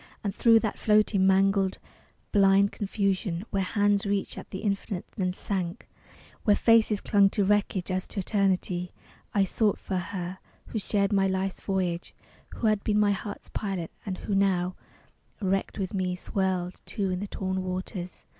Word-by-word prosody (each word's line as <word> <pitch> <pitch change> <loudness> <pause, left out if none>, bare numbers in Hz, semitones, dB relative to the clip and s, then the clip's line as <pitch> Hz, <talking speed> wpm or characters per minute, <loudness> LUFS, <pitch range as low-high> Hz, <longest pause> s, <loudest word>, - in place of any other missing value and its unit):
And 200 -2 -1
thro 230 +2 +5
that 220 -2 -1
floating, 210 -2 +3
mangled, 195 0 +3 0.5
blind 200 0 +5
confusion, 195 -2 -1
Where 195 - +1
hands 205 +1 +2
reached 200 -1 -1
at - - -9
the 190 - -6
infinite 200 -2 -2
then 185 -4 0
sank, 185 0 -4 0.6
Where 205 - +5
faces 225 -2 +4
clung 200 -1 +4
to 205 - +1
wreckage 200 -2 +1
as 185 0 -1
to 205 - -5
eternity, 185 -3 0 0.5
I 200 - +5
sought 205 +2 +1
for 190 - -3
her 180 0 -4 0.3
who 220 - -2
shared 200 0 0
my 195 -1 +3
life's 190 0 -2
voyage, 185 -3 -2 0.4
Who - - -3
had 215 -2 +2
been 210 -1 +2
my 205 -1 +4
heart's 200 +1 -5
pilot; 195 -6 -3
and 190 -3 -4
who 205 - -4
now, 185 -2 +2 0.6
Wrecked 195 -2 -1
with 195 -1 -3
me, 185 -2 -1
swirled, 185 -1 -2
too, 195 -3 -1
in 180 - -1
the 205 - -4
torn 190 -1 -2
waters.... 185 0 -5
195 Hz, 165 wpm, -27 LUFS, 185-205 Hz, 0.6 s, thro